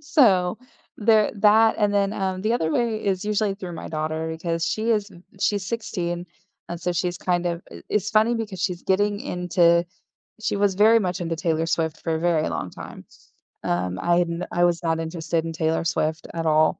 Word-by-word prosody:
so 220 - +3 0.4
there 215 -1 +4
that 220 +2 +5
and 205 -1 +2
then, 200 0 +1
um, 190 -2 -2
the 220 +2 +1
other 160 -9 0
way 230 -3 0
is 195 0 0
usually 210 -1 0
through 185 -3 -7
my 165 - -7
daughter 155 +1 -2
because 165 0 -2
she 220 +2 -1
is 210 -2 +1
v 175 -2 -16 0.2
she's 200 -3 0
16, 175 -6 -3 0.4
and 175 0 -5
so 180 - -1
she's 175 0 -1
kind 175 -1 0
of 170 0 -2
i - - -10
it's 210 -1 +1
funny 220 +2 +3
because 220 -5 -4
she's 180 -2 -2
getting 205 +2 +1
into 175 -1 +2 0.6
she 215 - -1
was 200 -1 +2
very 220 +3 +6
much 185 -4 -2
into 165 -1 -2
Taylor 165 -1 0
Swift 160 -1 -1
for 165 -1 -1
a - - -4
very 165 -2 +1
long 90 - -4
time, - - -10 0.6
um, 90 +1 -1
I 175 0 +3
had 175 -1 +2
n 170 +1 -3
I 175 - +1
was 175 -1 +2
not 165 0 0
interested 165 0 -2
in 165 - -3
Taylor 160 +1 0
Swift 160 -1 -1
at 165 -1 -3
all, 155 0 +3
180 Hz, 205 wpm, -24 LUFS, 165-205 Hz, 0.6 s, very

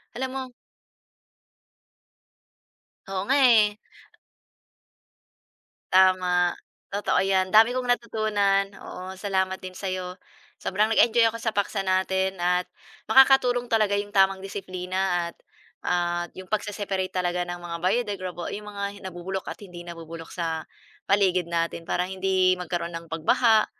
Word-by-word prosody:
Alam 260 +1 -3
mo 265 -1 -3 2.6
Oo, 190 0 -3
nga 275 +2 +3
eh. 220 -4 +6 2.2
Tama, 185 -1 +4 0.4
totoo 205 - 0
'yan, 190 -1 +2
dami 225 +4 +6
kong 255 -1 -2
natutunan, 210 -4 +1
oo, 185 +1 -8
salamat 190 -1 -1
din 185 0 -9
sa'yo. 185 -1 -4 0.5
Sobrang 205 +3 +1
nag-enjoy 230 0 +5
ako 230 - -7
sa 225 - 0
paksa 200 -1 -1
natin, 190 0 0
at 180 +1 0 0.4
makakatulong 250 -1 +5
talaga 215 -4 +2
'yong 205 0 -4
tamang 195 -1 +4
disiplina 185 -2 -3
at, - - -40 0.5
at 175 -1 -1
'yong 185 - -8
pag-se-separate 200 -2 -2
talaga 180 -1 -1
ng 175 0 -4
mga 175 -1 -6
biodegradable- 185 -4 -2
'yong 210 0 -7
mga 200 -1 -6 0.3
nabubulok 185 +2 -5
at - - -6
hindi 175 -2 -10
nabubulok 165 -1 -9
sa, 165 -2 -2 0.5
paligid 185 -3 +2
natin. 170 0 -2
Para 180 - +1
hindi 185 0 +2
magkaroon 175 -1 -4
ng 165 0 -7
pagbaha, 220 +7 +3
190 Hz, 125 wpm, -25 LUFS, 180-205 Hz, 2.6 s, eh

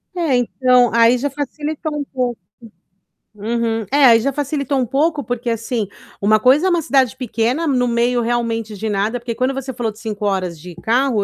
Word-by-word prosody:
É, 330 -7 +1
então 250 0 +3
aí 235 +2 +5
já 285 +4 -2
facilitou 295 +2 -4
um 290 - -2
pouco. 250 -4 -3 0.9
Uhum. 225 +1 -2
É, 285 0 +5
aí 230 -3 +7
já 275 +4 -1
facilitou 280 -1 -2
um 255 - +1
pouco 290 +4 0
porque, 245 -1 -3
assim, 230 -1 -2 0.3
uma 215 +2 +4
coisa 275 - +4
é - - +3
uma 345 -2 +2
cidade 265 -5 +2
pequena 245 +5 -1
no 255 -5 +1
meio 240 +1 +1
realmente 230 -2 -2
de 220 +2 -4
nada, 210 +4 -1
porque 235 0 -4
quando 255 +4 0
você 270 0 -5
falou 235 -2 -2
de 215 - -17
5 210 -2 -4
horas 185 -4 -1
de 175 +2 -10
carro, 230 +4 +1
245 Hz, 190 wpm, -19 LUFS, 225-275 Hz, 0.9 s, aí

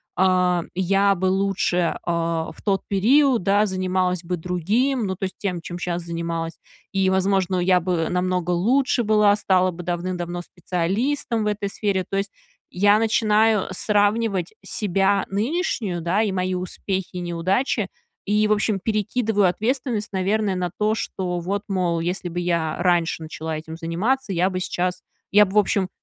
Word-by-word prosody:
а, 180 -2 +3
я 195 +2 +3
бы 185 - -2
лучше, 185 -2 +1
а, 165 -1 -1
в - - -17
тот 195 -2 0
период, 245 +3 +3
да, 205 +2 +3
занималась 185 -2 -1
бы 180 +1 -2
другим. 205 - 0
Ну, 190 - -2
то - - -8
есть 190 - -3
тем, 185 -4 -2
чем 175 +1 -7
щас 175 0 -3
занималась, 165 -1 -3 0.4
и, 190 -1 +2
возможно, 190 -1 +1
я 180 0 +3
бы 170 -2 0
намного 180 -1 0
лучше 245 +8 +2
была. 210 -1 +4
Стала 185 -3 +2
бы 175 +1 -8
давным-давно 175 0 -3
специалистом 210 - -1
в - - -1
этой 205 -1 -1
сфере. 195 -2 -1
То 195 - -3
есть, 195 0 -2 0.4
я 205 +3 +5
начинаю 220 -1 +3
сравнивать 205 -1 +1
себя 195 0 +1
нынешнюю, 210 - -1
да, 175 +6 +1
и 205 - 0
мои 185 0 -1
успехи 185 +1 -3
и 180 - -4
неудачи. 185 +6 0 0.4
И, 210 +1 +2
в - - -1
общем, 210 -1 0
перекидываю 215 0 +1
ответственность, 230 +2 -1
наверное, 195 +1 0
на 180 -1 -1
то, 215 +1 +2
что 180 -4 -3
вот, 195 +4 -2
мол, 180 -4 0
если 175 +1 -3
бы 175 - -4
я 170 -3 0
раньше 175 -2 +1
начала 160 0 -5
этим 160 +1 -8
заниматься, 195 +10 -1
я 180 +2 +2
бы 185 - -2
сейчас 180 0 -2 0.3
я 210 +1 +7
бы, 190 - -8
в - - +3
общем 195 -2 +1
190 Hz, 165 wpm, -23 LUFS, 175-210 Hz, 0.4 s, я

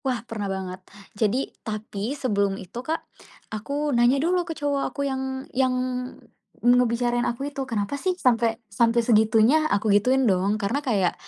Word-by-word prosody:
Wah 245 -3 -1
pernah 210 -4 -4
banget. 190 -1 -5 0.3
Jadi 215 +4 +1 0.2
tapi 215 +3 -4
sebelum 200 -7 0
itu 195 +7 -7
Kak, 315 +5 -3 0.5
aku 280 +7 -2
nanya 240 +3 +4
dulu 350 +5 +2
ke 325 - -4
cowok 285 -1 -1
aku 280 - -3
yang 265 -1 -3
yang 255 0 +2 0.9
ngebicarain 240 0 +3
aku 270 +4 -2
itu, 275 - -4
"Kenapa 220 +4 -2
sih 370 -1 0
sampai 230 -6 +2
sampai 230 +3 +2
segitunya?" 225 +7 +4
Aku 205 0 +2
gituin, 255 +6 +3
dong. 195 0 +2
Karena 215 +7 -1
kayak 205 - +1
240 Hz, 155 wpm, -24 LUFS, 210-270 Hz, 0.9 s, nanya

